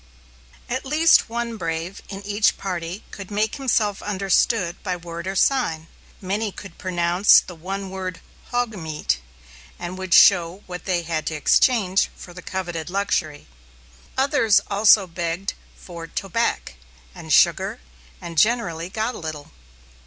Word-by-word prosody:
At 255 +2 -3
least 305 0 +4
one 235 0 -3
brave 165 +1 -4
in 195 0 -7
each 205 +1 +2
party 180 0 -5
could 200 -2 -9
make 215 +3 -1
himself 220 -7 0
understood 195 -1 +1
by 185 -2 -2
word 170 0 -7
or 190 - -3
sign. 190 - +1 0.3
Many 205 +3 -2
could 195 -2 -11
pronounce 175 +1 +4
the 180 - -9
one 190 +3 -6
word 185 -2 -5 0.3
"hogmeat," 205 -11 -1 0.6
and 180 +2 -6
would 185 -2 +2
show 180 0 +5
what 180 -1 -8
they 180 -3 0
had 160 -1 -3
to 160 - -2
exchange 195 - +3
for 175 - -12
the 180 - -10
coveted 175 -3 -4
luxury. 180 -6 -1 0.7
Others 260 -7 +4
also 205 0 +6
begged 170 +2 -3 0.2
for 170 -2 -9
"tobac," 195 - -2 0.4
and - - -9
sugar, - - +3 0.4
and 170 -2 -3
generally 180 -7 +1
got 220 +4 -2
a - - -8
little. 155 -3 -7
190 Hz, 140 wpm, -23 LUFS, 170-210 Hz, 0.7 s, also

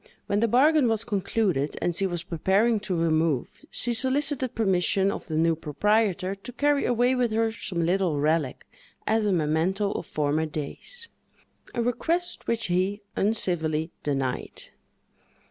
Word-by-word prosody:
When 200 - 0
the 230 - +3
bargain 280 +4 +4
was 225 -1 0
concluded, 195 - -1
and 175 - 0
she 195 +2 +1
was 175 -2 -3
preparing 195 +6 +2
to 185 - +1
remove, 160 -4 0
she 240 - 0
solicited 265 +1 0
permission 195 -2 +2
of - - -6
the 155 -2 -2
new 165 0 +3
proprietor 190 +5 +1
to 200 +5 -9
carry 285 +2 +2
away 245 +1 +2
with 250 -3 +1
her 225 0 +1
some 185 -6 -3
little 175 -4 +1
relic 150 -2 0 0.4
as 220 -1 +2
a - - +2
memento 175 +5 +1
of - - -5
former 150 +1 0
days—a 235 - -8
request 335 +9 -1
which 230 -1 +1
he 185 +3 0
uncivilly 170 -7 0
denied. 135 -3 -3
195 Hz, 145 wpm, -26 LUFS, 165-230 Hz, 0.4 s, bargain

